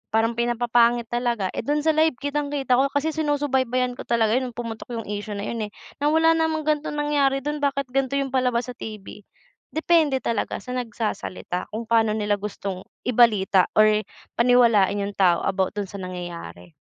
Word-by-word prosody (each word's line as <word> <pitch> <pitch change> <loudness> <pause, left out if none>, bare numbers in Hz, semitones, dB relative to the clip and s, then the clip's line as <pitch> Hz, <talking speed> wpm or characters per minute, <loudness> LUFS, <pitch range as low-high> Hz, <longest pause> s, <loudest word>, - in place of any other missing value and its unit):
parang 225 +1 +3
pinapapangit 235 0 +1
talaga. 240 -5 -1
Eh, - - -5
do'n 295 +5 -1
sa 320 - +4
live 315 -2 +2
kitang-kita 285 -2 0
ko. 275 - +4
Kasi 285 +3 -1
sinusubaybayan 265 -5 0
ko - - -8
talaga 225 -2 +2
'yon 260 - -3
no'ng 235 - -15
pumutok 230 -1 -6
'yong 225 - -5
issue 205 0 -4
na 200 - -4
'yon, 220 0 -3
eh. 205 - -17 0.3
Na 290 - +1
wala 320 +2 +4
namang 320 -1 +1
ganitong 300 0 -1
nangyari 285 -2 +1
do'n, 295 +1 -2
bakit 280 -1 0
ganito 270 0 0
'yong 275 -1 -1
palabas 250 -1 0
sa - - -9
TV? 210 -1 -9 0.5
Depende 315 -4 +2
talaga 225 -3 -2
sa 250 - -7
nagsasalita 225 -7 -4
kung 220 +2 -5
paano 225 -2 +3
nila 205 -1 0
gustong 195 -2 -6 0.2
ibalita 210 -6 +4
or 215 0 +5 0.4
paniwalain 230 -5 +4
'yong 200 0 -5
tao 175 -3 +4
about 190 +1 0
do'n 205 -2 -3
sa 200 - -8
nangyayari. 175 - -7
240 Hz, 180 wpm, -24 LUFS, 210-280 Hz, 0.5 s, or